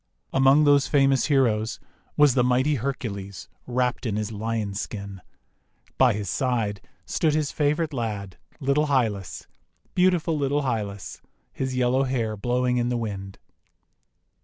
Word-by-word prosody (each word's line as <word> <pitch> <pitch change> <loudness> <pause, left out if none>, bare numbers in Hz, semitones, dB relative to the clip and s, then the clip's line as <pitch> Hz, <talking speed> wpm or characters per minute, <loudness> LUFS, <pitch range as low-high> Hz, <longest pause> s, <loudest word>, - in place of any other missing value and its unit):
1 135 - +1
Among 135 +3 +6
those 145 -2 +4
famous 135 -2 +3
heroes 120 -6 +1 0.4
was 150 -3 +6
the 125 - +3
Mighty 130 +4 +2
Hercules 110 -7 -4 0.2
wrapped 125 0 -1
in 105 - -1
his 105 0 -2
lion 110 -1 -3
skin. 100 -1 -6 0.8
By 130 -3 +5
his 105 -1 -4
side 110 -3 -1 0.2
stood 155 -2 +1
his 155 -2 0
favourite 150 +1 0
lad, 105 -7 -4 0.2
little 145 +1 +1
Hylas, 110 - -1 0.5
beautiful 180 -3 +2
little 145 0 0
Hylas, 105 -6 -4 0.3
his 130 -1 -3
yellow 125 +1 +2
hair 120 -5 -1
blowing 125 +3 0
in 120 0 0
the 120 - 0
wind. 100 -4 -5
125 Hz, 135 wpm, -25 LUFS, 105-140 Hz, 0.8 s, Among